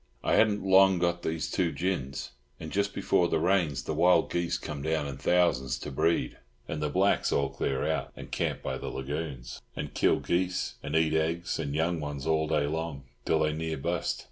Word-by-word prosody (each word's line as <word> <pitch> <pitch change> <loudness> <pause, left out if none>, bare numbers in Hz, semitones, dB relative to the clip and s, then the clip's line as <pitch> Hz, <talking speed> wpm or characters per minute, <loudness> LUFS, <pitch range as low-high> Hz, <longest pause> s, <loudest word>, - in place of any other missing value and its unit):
I - - +1
hadn't 105 -3 +3
long 95 0 +6
got 85 0 0
these 80 -2 -2
two 85 -3 +1
gins; 70 -8 -3 0.3
and 80 - -7
just 100 0 0
before 95 -3 +2
the - - +1
rains 85 -3 +1
the - - -3
wild 90 +4 +4
geese 85 -1 0
come 75 -2 -6
down 80 0 0
in 70 -1 -5
thousands 70 -4 +2
to 75 - -7
breed, 85 +5 0 0.3
and 75 - -4
the 75 - 0
blacks 95 +6 +2
all 70 -1 +1
clear 65 -1 -1
out - - -1
and - - -10
camp - - -2
by - - -3
the - - -6
lagoons, 65 -3 -5
and - - -5
kill - - +3
geese 90 +1 -1
and 75 - -4
eat 80 -1 +3
eggs 80 +3 0
and 70 -2 -3
young 80 +2 +1
ones 75 -2 -5
all 80 -1 +1
day 75 -2 +1
long, 80 -2 -3 0.2
till 80 - +2
they 75 0 +2
near 80 0 -3
bust. 85 +5 -1
80 Hz, 200 wpm, -29 LUFS, 75-85 Hz, 0.3 s, long